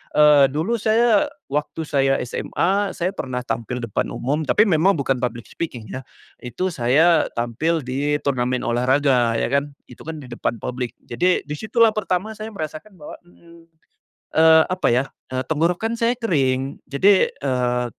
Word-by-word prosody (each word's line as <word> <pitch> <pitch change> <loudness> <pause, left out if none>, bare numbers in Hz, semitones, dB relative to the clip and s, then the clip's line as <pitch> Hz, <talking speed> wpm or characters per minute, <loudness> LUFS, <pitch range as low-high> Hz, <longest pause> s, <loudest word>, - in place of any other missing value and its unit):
eee, 150 -2 +7
dulu 175 +11 0
saya 220 0 +3 0.3
waktu 150 +3 -2
saya 135 -1 +2
SMA, 195 +10 -1
saya 175 +1 -1
pernah 125 -1 -3
tampil 125 +1 -3
depan 110 -4 -2
umum, 145 +5 -2
tapi 210 - +3
memang 185 +2 +3
bukan 135 -2 0
public 120 -2 -4
speaking 120 -10 -6
ya, 130 - -6 0.4
itu 125 +10 -3
saya 155 +6 +3
tampil 135 +8 -1
di 140 +3 -1
turnamen 125 -2 0
olahraga 125 0 +2
ya - - 0
kan, 140 +1 0 0.2
itu 125 - -14
kan 160 -1 -6
di 130 - -11
depan 120 0 -2
publik 125 -1 -4
jadi 180 +10 +1
di 150 0 -6
situlah 225 +4 +3
pertama 210 0 -2
saya 215 +1 -6
merasakan 160 +3 -7
bahwa, 150 - -9
mmm, 170 -1 -19 0.8
eee, 160 0 +7
apa 185 0 0
ya, 130 +3 +2 0.3
eee, 130 - -1
tenggorokan 175 +9 0
saya 235 +1 +2
kering, 135 - 0
jadi, 190 +8 +4
eee, 125 -2 -1
145 Hz, 155 wpm, -21 LUFS, 125-180 Hz, 0.8 s, eee